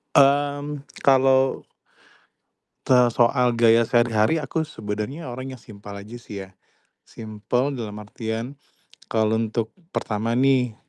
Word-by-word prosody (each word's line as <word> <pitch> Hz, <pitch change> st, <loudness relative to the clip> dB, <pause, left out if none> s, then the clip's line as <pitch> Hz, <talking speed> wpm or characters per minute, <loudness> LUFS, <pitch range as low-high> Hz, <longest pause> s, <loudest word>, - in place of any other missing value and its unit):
Mmm, 145 Hz, +1 st, +3 dB, 0.2 s
kalau 135 Hz, 0 st, +3 dB, 1.2 s
te 130 Hz, -, +4 dB, 0.2 s
soal 120 Hz, 0 st, +3 dB
gaya 115 Hz, 0 st, +5 dB
sehari-hari 120 Hz, +4 st, +3 dB
aku 150 Hz, +3 st, -2 dB
sebenarnya 110 Hz, +5 st, -5 dB
orang 130 Hz, +2 st, -6 dB
yang 120 Hz, -, -17 dB
simpel 100 Hz, -2 st, -11 dB
aja 105 Hz, +4 st, -9 dB
sih 100 Hz, -4 st, -8 dB
ya. -, -, -19 dB, 0.6 s
Simpel 115 Hz, +5 st, -3 dB
dalam 105 Hz, -3 st, -6 dB
artian 115 Hz, +4 st, -5 dB, 0.6 s
kalau 110 Hz, -1 st, +2 dB
untuk 110 Hz, 0 st, -2 dB, 0.2 s
pertama 110 Hz, +2 st, -1 dB
nih, 130 Hz, -3 st, +3 dB
120 Hz, 115 wpm, -23 LUFS, 110-135 Hz, 1.2 s, gaya